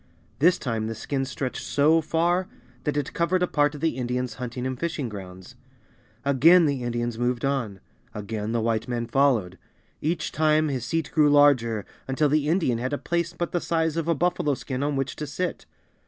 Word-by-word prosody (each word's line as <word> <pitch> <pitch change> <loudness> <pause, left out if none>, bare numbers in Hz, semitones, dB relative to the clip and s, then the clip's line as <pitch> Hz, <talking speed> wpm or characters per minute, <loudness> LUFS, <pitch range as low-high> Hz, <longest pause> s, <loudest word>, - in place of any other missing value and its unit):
This 175 +5 +5
time 115 -3 -2
the 115 - -4
skin 135 +5 -2
stretched 130 0 -4
so 155 +3 +3
far 170 +4 +1 0.4
that 150 0 0
it 145 -1 -2
covered 180 +2 +1
a - - +2
part 145 -1 +1
of 145 - -9
the 160 -6 0
Indians' 125 -1 -2
hunting 125 0 -4
and 130 -1 -3
fishing 160 -7 -2
grounds. 95 -3 -9 0.7
Again 160 +6 +6
the 140 -3 0
Indians 120 -1 -2
moved 120 +1 0
on. 120 -8 -2 0.4
Again 105 +1 -4
the 115 -1 0
White 115 0 0
man 120 -1 -2
followed. 120 -8 +1 0.4
Each 165 +3 -1
time 155 0 +2
his 130 -4 -3
seat 160 +4 -2
grew 150 -2 +5
larger, 130 -7 +4 0.2
until 140 +3 +1
the 150 0 +1
Indian 160 -9 +1
had 130 +4 -2
a - - +1
place 170 +1 -2
but 175 0 -2
the 175 - -1
size 160 -2 0
of 165 -1 -2
a 170 - +2
buffalo 170 -3 +1
skin 130 0 -5
on 145 0 0
which 135 -1 -2
to 150 - -4
sit. 175 +6 -4
140 Hz, 195 wpm, -25 LUFS, 120-160 Hz, 0.7 s, Again